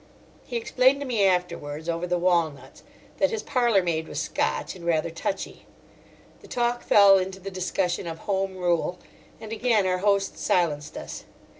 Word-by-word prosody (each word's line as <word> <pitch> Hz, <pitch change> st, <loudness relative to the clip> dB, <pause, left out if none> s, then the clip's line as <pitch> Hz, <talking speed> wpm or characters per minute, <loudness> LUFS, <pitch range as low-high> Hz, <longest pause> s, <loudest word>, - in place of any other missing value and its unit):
He 240 Hz, -, -2 dB
explained 255 Hz, +4 st, +3 dB
to -, -, -3 dB
me 230 Hz, -6 st, +1 dB
afterwards, 160 Hz, -4 st, -2 dB
over 170 Hz, +1 st, -2 dB
the 180 Hz, 0 st, +1 dB
walnuts, 170 Hz, -5 st, 0 dB, 0.4 s
that -, -, +3 dB
his 450 Hz, -2 st, -3 dB
parlourmaid 190 Hz, -10 st, +1 dB
was -, -, -4 dB
Scotch -, -, -2 dB
and 180 Hz, -, -12 dB
rather 165 Hz, -1 st, 0 dB
touchy. 180 Hz, +4 st, -5 dB, 0.7 s
The -, -, -16 dB
talk 240 Hz, 0 st, 0 dB
fell 200 Hz, -1 st, +6 dB
into 190 Hz, +1 st, -4 dB
the 195 Hz, +1 st, -7 dB
discussion 180 Hz, -1 st, -2 dB
of 165 Hz, -1 st, -5 dB
Home 195 Hz, -1 st, -1 dB
Rule, 175 Hz, 0 st, 0 dB, 0.4 s
and 220 Hz, 0 st, -7 dB
again 225 Hz, -3 st, +2 dB
our 185 Hz, 0 st, +1 dB
host 200 Hz, 0 st, +1 dB
silenced 155 Hz, -4 st, 0 dB
us. -, -, -8 dB
185 Hz, 160 wpm, -25 LUFS, 170-210 Hz, 0.7 s, fell